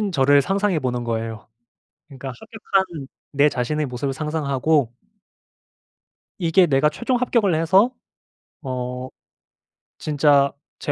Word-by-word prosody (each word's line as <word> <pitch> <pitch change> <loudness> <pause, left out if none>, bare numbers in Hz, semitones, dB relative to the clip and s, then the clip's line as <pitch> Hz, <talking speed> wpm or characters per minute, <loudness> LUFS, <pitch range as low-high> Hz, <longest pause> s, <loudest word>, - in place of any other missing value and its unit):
합격된 205 -3 -1
저를 140 -1 +4
상상해 195 +1 0
보는 125 -3 -2
거예요. 115 -1 -4 0.6
그러니까 135 -2 -8
합격한 190 -9 -2 0.2
내 145 +1 +4
자신의 150 +5 -1
모습을 135 +2 -3
상상하고 150 -3 0 1.5
이게 175 +1 +4
내가 140 -1 +3
최종 240 +11 -1
합격을 235 -6 +1
해서 190 +9 +4 0.7
어 125 -1 -4 0.9
진짜 145 -2 +3 0.3
제 - - -2
150 Hz, 255 characters per minute, -22 LUFS, 130-175 Hz, 1.5 s, 저를